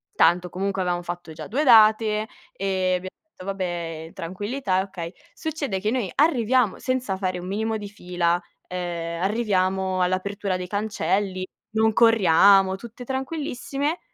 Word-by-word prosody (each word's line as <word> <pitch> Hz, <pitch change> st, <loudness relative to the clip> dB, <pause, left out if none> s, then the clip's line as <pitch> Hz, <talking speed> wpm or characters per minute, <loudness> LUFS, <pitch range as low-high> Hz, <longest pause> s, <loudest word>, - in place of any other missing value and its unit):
tanto, 175 Hz, +2 st, +4 dB
comunque, 195 Hz, +1 st, -2 dB
avevamo 175 Hz, -1 st, 0 dB
fatto 175 Hz, -2 st, -6 dB
già -, -, -8 dB
due 280 Hz, +8 st, 0 dB
date 220 Hz, -2 st, +5 dB, 0.3 s
e 190 Hz, -1 st, 0 dB
abbiam 185 Hz, +1 st, -4 dB
detto: 315 Hz, -12 st, -15 dB
"Vabbè, 175 Hz, -4 st, -3 dB
in -, -, -16 dB
tranquillità 190 Hz, +4 st, -2 dB
e -, -, +3 dB
okay". 175 Hz, -3 st, -7 dB, 0.2 s
Succede 285 Hz, -11 st, -3 dB
che 210 Hz, +2 st, 0 dB
noi 240 Hz, -7 st, -1 dB
arriviamo 255 Hz, -, +3 dB
senza 255 Hz, -7 st, -1 dB
fare 185 Hz, -2 st, -2 dB
un 180 Hz, -, -7 dB
minimo 220 Hz, +3 st, -1 dB
di 205 Hz, -1 st, -7 dB
fila, 175 Hz, -3 st, -1 dB, 0.3 s
ehm, 170 Hz, -2 st, -4 dB
arriviamo 190 Hz, -3 st, +1 dB
all'apertura 190 Hz, +2 st, -1 dB
dei 180 Hz, 0 st, -4 dB
cancelli, 200 Hz, -2 st, -1 dB, 0.3 s
non 220 Hz, 0 st, +3 dB
corriamo, 195 Hz, -3 st, +5 dB
tutte 235 Hz, +3 st, -10 dB
tranquillissime. 275 Hz, +3 st, -3 dB
195 Hz, 145 wpm, -24 LUFS, 180-225 Hz, 0.3 s, date